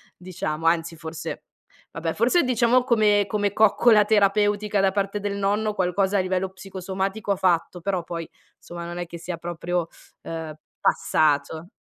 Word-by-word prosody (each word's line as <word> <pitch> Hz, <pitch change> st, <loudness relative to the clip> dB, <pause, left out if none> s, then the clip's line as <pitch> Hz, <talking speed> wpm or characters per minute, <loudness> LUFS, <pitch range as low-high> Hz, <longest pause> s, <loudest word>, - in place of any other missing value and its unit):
diciamo, 165 Hz, -3 st, -4 dB
anzi 165 Hz, 0 st, +1 dB
forse 160 Hz, 0 st, -7 dB, 0.5 s
vabbè 165 Hz, 0 st, -3 dB
forse 255 Hz, +10 st, +3 dB
diciamo 250 Hz, 0 st, +3 dB
come 210 Hz, -4 st, +3 dB
come 205 Hz, 0 st, -1 dB
coccola 215 Hz, 0 st, +5 dB
terapeutica 205 Hz, 0 st, +2 dB
da 195 Hz, 0 st, +3 dB
parte 200 Hz, +1 st, -1 dB
del 200 Hz, 0 st, -3 dB
nonno 205 Hz, +2 st, 0 dB
qualcosa 190 Hz, +1 st, +1 dB
a -, -, +3 dB
livello 185 Hz, 0 st, -1 dB
psicosomatico 190 Hz, +2 st, -4 dB
ha -, -, +3 dB
fatto, 175 Hz, -1 st, 0 dB
però 185 Hz, -2 st, -1 dB
poi, 165 Hz, -1 st, -6 dB, 0.3 s
insomma, 170 Hz, 0 st, -8 dB
non 175 Hz, +1 st, -6 dB
è 175 Hz, -, -4 dB
che 170 Hz, -, -8 dB
sia 170 Hz, 0 st, -6 dB
proprio, 175 Hz, 0 st, -3 dB, 0.4 s
uhm, 160 Hz, -2 st, -5 dB, 0.3 s
passato. 155 Hz, +3 st, +1 dB
190 Hz, 150 wpm, -24 LUFS, 170-205 Hz, 0.5 s, coccola